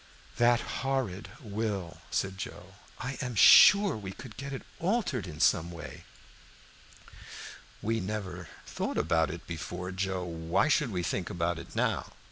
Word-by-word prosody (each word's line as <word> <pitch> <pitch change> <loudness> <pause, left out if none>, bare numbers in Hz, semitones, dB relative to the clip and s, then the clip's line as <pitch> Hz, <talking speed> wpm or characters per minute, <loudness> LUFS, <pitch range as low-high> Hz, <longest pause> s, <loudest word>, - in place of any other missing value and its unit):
"That 120 0 +4 0.2
horrid 130 -8 -2
will," 100 -5 -4
said 95 -1 -2
Joe. - - -8 0.2
"I 135 +1 -5
am 125 -2 -4
sure 200 - +8
we 100 -3 -6
could 110 0 -11
get 140 0 -6
it 135 - -5 0.2
altered 175 - 0
in 75 -3 -8
some 85 -1 +3
way." 85 -1 -9 1.8
"We 115 +1 0
never 95 -4 -5 0.2
thought - - -3
about 80 -1 +2
it 85 +1 -7
before, 90 +2 -5
Joe. 95 -1 -2
Why 85 - 0
should 145 -2 +3
we 90 -4 -2
think 85 +2 -2
about 85 0 -1
it 85 - -11
now? - - 0
95 Hz, 145 wpm, -30 LUFS, 85-125 Hz, 1.8 s, sure